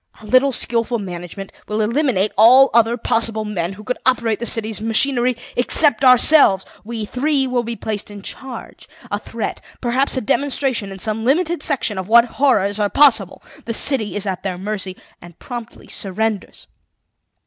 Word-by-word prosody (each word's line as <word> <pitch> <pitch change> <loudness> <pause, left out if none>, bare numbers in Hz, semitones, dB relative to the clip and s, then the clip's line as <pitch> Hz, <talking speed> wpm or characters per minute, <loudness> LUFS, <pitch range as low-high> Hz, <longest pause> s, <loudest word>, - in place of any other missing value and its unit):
A 220 - -14
little 255 +5 +3
skilful 235 -1 -1
management 185 0 -8 0.2
will 210 +1 -2
eliminate 220 -3 0
all 255 +6 +6
other 235 +1 +3
possible 225 -1 -1
men 185 -3 -3
who 210 +2 -12
could 250 +3 -4
operate 235 -4 +1
the 235 - -4
city's 220 -2 -2
machinery, 240 +2 +1 0.2
except 265 0 +3
ourselves. 255 - +6 0.2
We 225 0 -5
three 270 +4 0
will 250 -1 -1
be 235 0 -5
placed 215 -2 -5
in 205 -1 -11
charge. 260 +1 -9 0.2
A - - -2
threat, - - -6 0.2
perhaps 260 +3 0
a - - 0
demonstration 260 -4 -1
in 195 - -8
some 215 +3 -1
limited 330 +6 0
section 250 -10 -1
of 185 - -6
what 235 +2 +6 0.2
horrors 205 -7 +2
are 205 -1 +1
possible. 225 -7 +3 0.2
The 230 - -4
city 230 -7 +3
is 205 0 -1
at 190 -2 -3
their 185 -2 -4
mercy, 195 -1 -5 0.2
and 175 -1 -14
promptly 240 -2 -9
surrenders. 210 +1 -4
225 Hz, 165 wpm, -19 LUFS, 205-255 Hz, 0.2 s, all